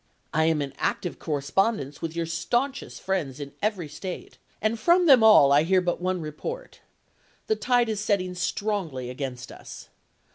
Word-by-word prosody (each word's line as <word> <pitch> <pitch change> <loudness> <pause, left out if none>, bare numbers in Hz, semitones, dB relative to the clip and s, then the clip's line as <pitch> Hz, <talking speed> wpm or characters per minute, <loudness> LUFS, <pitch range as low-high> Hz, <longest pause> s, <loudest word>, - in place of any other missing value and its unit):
I 160 +1 +3
am 160 -2 +2
in 140 -1 -7
active 175 - -2
correspondence 145 - -1
with 165 -1 -4
your 170 0 -1
stanchest 240 +12 -2
friends 155 -8 -2
in 140 -1 -7
every 200 -6 -1
State 165 +5 -8 0.2
and 220 +1 0
from 350 +7 +4
them 270 -7 +7
all 210 -11 +7
I 145 +1 +6
hear 185 +4 +3
but 175 -1 -2
one 185 -1 -1
report. 475 - -7 0.7
The 435 - +1
tide 245 - +2
is 215 -2 -2
setting 200 -3 0
strongly 180 - -2
against 125 -2 -6
us. - - -11
180 Hz, 160 wpm, -26 LUFS, 150-215 Hz, 0.7 s, them